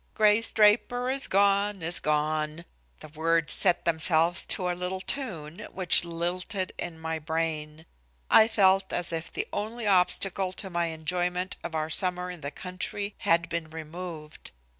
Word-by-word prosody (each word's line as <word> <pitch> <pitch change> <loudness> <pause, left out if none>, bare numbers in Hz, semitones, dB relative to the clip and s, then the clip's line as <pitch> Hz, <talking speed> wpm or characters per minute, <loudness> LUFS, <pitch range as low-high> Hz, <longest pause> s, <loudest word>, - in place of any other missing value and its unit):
"Grace 215 +1 +4
Draper 240 +4 +3
is 275 +1 0
gone, 200 -1 +2
is 170 +2 +1
gone." 155 +2 -1 0.4
The - - -8
words 165 +1 +1
set 180 -3 +3
themselves 165 +1 +2
to 180 - +2
a 180 - 0
little 180 +1 -4
tune, 185 - -4
which 180 -2 +2
lilted 175 +3 -3
in 170 -2 -4
my 160 0 -3
brain. 160 0 -3 0.4
I 220 - +7
felt 195 -3 +3
as 175 -1 -2
if 165 0 -4
the - - -2
only 220 +2 -4
obstacle 185 0 +2
to 190 0 -5
my 175 0 0
enjoyment 180 +3 -2
of 160 - -5
our 155 0 -2
summer 180 +1 -1
in 175 -3 -10
the 140 - -3
country 185 +5 -5
had 170 +1 +2
been 170 -2 -4
removed. 160 0 -8
175 Hz, 155 wpm, -27 LUFS, 160-190 Hz, 0.4 s, I